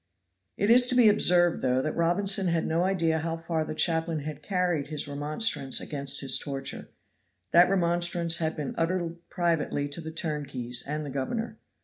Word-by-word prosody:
It 205 Hz, +3 st, +2 dB
is 245 Hz, +1 st, +6 dB
to 250 Hz, -, 0 dB
be 245 Hz, -3 st, +6 dB
observed, 175 Hz, -4 st, +3 dB
though, 130 Hz, 0 st, +1 dB
that 155 Hz, +3 st, -3 dB
Robinson 190 Hz, +3 st, +1 dB
had 170 Hz, -1 st, 0 dB
no 165 Hz, +2 st, 0 dB
idea 165 Hz, -4 st, 0 dB
how 165 Hz, +1 st, -3 dB
far 165 Hz, -1 st, -2 dB
the 155 Hz, -, -6 dB
chaplain 165 Hz, -1 st, 0 dB
had 150 Hz, 0 st, -7 dB
carried 180 Hz, -4 st, -1 dB
his 150 Hz, -1 st, -2 dB
remonstrance 145 Hz, -, 0 dB
against 140 Hz, -1 st, -2 dB
his 135 Hz, -2 st, +3 dB
torture; 135 Hz, -1 st, -6 dB, 0.6 s
that 175 Hz, +1 st, +6 dB
remonstrance 175 Hz, -2 st, +1 dB
had 160 Hz, -1 st, -1 dB
been 150 Hz, -4 st, -5 dB
uttered 170 Hz, 0 st, -1 dB
privately 165 Hz, -4 st, -1 dB
to 145 Hz, +4 st, -6 dB
the 160 Hz, -, -7 dB
turnkeys 140 Hz, -7 st, -3 dB
and 150 Hz, +1 st, -4 dB
the 140 Hz, -, -6 dB
governor. 220 Hz, -, -4 dB
165 Hz, 170 wpm, -27 LUFS, 145-175 Hz, 0.6 s, is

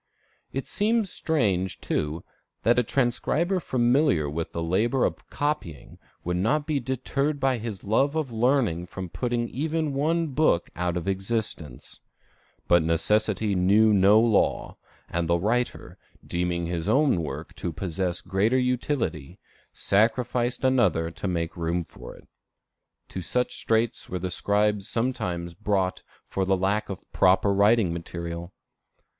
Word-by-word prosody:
It 135 Hz, -, -3 dB
seems 215 Hz, -1 st, +1 dB
strange, 100 Hz, -, 0 dB
too, 75 Hz, +2 st, -2 dB, 0.4 s
that 120 Hz, +2 st, +4 dB
a -, -, +5 dB
transcriber 140 Hz, -, 0 dB
familiar 120 Hz, -, +2 dB
with 80 Hz, +3 st, -4 dB
the 85 Hz, -, -3 dB
labor 110 Hz, +10 st, +1 dB
of -, -, -4 dB
copying 145 Hz, -, -3 dB, 0.2 s
would 90 Hz, +1 st, -1 dB
not 145 Hz, +11 st, +1 dB
be 150 Hz, -2 st, 0 dB
deterred 135 Hz, +3 st, -2 dB
by 130 Hz, -2 st, +1 dB
his 110 Hz, -4 st, -6 dB
love 135 Hz, +8 st, +2 dB
of 155 Hz, -6 st, -1 dB
learning 115 Hz, -7 st, +1 dB
from 95 Hz, -1 st, -6 dB
putting 120 Hz, +5 st, -1 dB
even 155 Hz, +2 st, -1 dB
one 160 Hz, +4 st, +1 dB
book 140 Hz, -, +1 dB
out 90 Hz, 0 st, -1 dB
of 90 Hz, +2 st, -4 dB
existence. 95 Hz, -, -3 dB, 0.7 s
But 85 Hz, 0 st, +5 dB
necessity 105 Hz, +5 st, +1 dB
knew 100 Hz, +4 st, +4 dB
no 100 Hz, +2 st, +6 dB
law; 115 Hz, -3 st, +1 dB, 0.3 s
and 85 Hz, -1 st, -2 dB
the 85 Hz, +1 st, +3 dB
writer, 120 Hz, +7 st, -2 dB, 0.3 s
deeming 85 Hz, -1 st, -1 dB
his 85 Hz, -1 st, -2 dB
own 135 Hz, -, +3 dB
work 75 Hz, 0 st, -6 dB
to 85 Hz, -, -3 dB
possess 90 Hz, +1 st, -2 dB
greater 105 Hz, +7 st, +1 dB
utility, 125 Hz, -, -1 dB, 0.3 s
sacrificed 120 Hz, +4 st, +1 dB
another 95 Hz, -11 st, +2 dB
to 85 Hz, +4 st, -5 dB
make 85 Hz, -2 st, -2 dB
room 85 Hz, +1 st, -1 dB
for -, -, -12 dB
it, -, -, -18 dB, 0.8 s
to 95 Hz, -, -5 dB
such 125 Hz, +9 st, -1 dB
straits 115 Hz, 0 st, 0 dB
were 90 Hz, -, -2 dB
the 90 Hz, +1 st, -4 dB
scribes 105 Hz, +1 st, +1 dB
sometimes 110 Hz, -9 st, -2 dB
brought 95 Hz, -2 st, -1 dB, 0.2 s
for 95 Hz, -, -2 dB
the 95 Hz, 0 st, +2 dB
lack 100 Hz, +3 st, 0 dB
of 95 Hz, -, -7 dB, 0.4 s
writing 100 Hz, -1 st, +4 dB
material. 85 Hz, +1 st, -6 dB
105 Hz, 140 wpm, -26 LUFS, 85-125 Hz, 0.8 s, no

